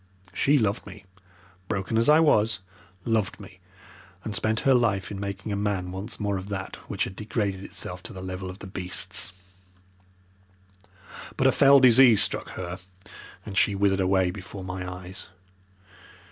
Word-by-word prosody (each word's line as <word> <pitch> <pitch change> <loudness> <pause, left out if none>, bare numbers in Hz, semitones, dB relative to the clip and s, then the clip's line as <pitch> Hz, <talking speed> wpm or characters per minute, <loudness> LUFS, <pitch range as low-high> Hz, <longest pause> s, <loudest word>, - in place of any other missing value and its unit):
She 145 +2 +3
loved 105 -5 0
me, 100 +1 -12 0.6
broken 100 +2 -2
as 115 +5 +3
I 155 +1 +7
was, 115 -9 +3 0.5
loved 110 -4 0
me, - - -13 0.6
and 110 - -4
spent 110 +2 +1
her 135 - +4
life 110 -6 +1
in 100 - -5
making 100 +1 -5
a - - 0
man 100 -3 -2
once 100 +5 -5
more 100 -2 -1
of 95 +2 -7
that 95 -2 -5
which - - -1
had 95 - -5
degraded 105 -3 -2
itself 90 -2 -6
to 115 - -8
the 95 -1 -8
level 95 0 -5
of 95 - -8
the 100 - -10
beasts. 95 0 -5 2.1
"But 130 - +1
a 135 - +6
fell 140 +1 +6
disease 125 -3 +7
struck - - -1
her, 90 0 -5 0.7
and 100 - -7
she 100 +1 +3
withered 95 0 +2
away 95 -1 +2
before 95 +1 -9
my 90 0 -5
eyes. 90 0 -8
100 Hz, 160 wpm, -26 LUFS, 95-110 Hz, 2.1 s, I